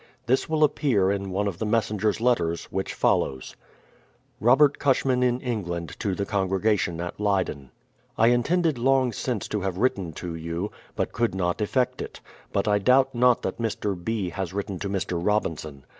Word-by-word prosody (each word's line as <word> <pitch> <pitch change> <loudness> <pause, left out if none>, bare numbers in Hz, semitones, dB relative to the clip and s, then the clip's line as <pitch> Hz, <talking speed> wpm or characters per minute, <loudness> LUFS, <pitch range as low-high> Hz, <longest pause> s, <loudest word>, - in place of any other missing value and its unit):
This 130 +6 +1
will 155 -1 +2
appear 125 -10 +2
in 100 -1 -2
one 100 +2 -1
of 90 -4 -4
the - - -1
messenger's 105 -1 +1
letters 90 -9 +1
which 95 - -3
follows: 65 -1 0 0.8
Robert 135 +5 +4
CusJiman 130 -2 +2
in 125 0 +2
England 85 -9 -3
to 100 -3 -1
the 100 - -2
Congregation 95 -2 0
at 90 +3 -5
Lcyden: 95 -10 -1 0.5
I 115 +1 +5
intended 150 +4 +2
long 130 -1 +3
since 120 -6 -3
to 105 - -2
have 95 -1 -2
written 100 -7 0
to 85 +2 -6
you, 85 +4 -4 0.2
but - - -1
could 115 -4 0
not 90 +2 -1
effect 125 +4 0
it; - - -7 0.3
but 100 +1 0
I 105 -1 +3
doubt 130 +5 +4
not 125 0 +3
that - - -3
Mr. 105 -3 -1
B. 95 +1 -3
has 95 +1 -4
written 100 -2 -3
to 100 - -3
Mr. 90 -3 -2
Robinson. 80 -9 -1
105 Hz, 175 wpm, -25 LUFS, 90-120 Hz, 0.8 s, I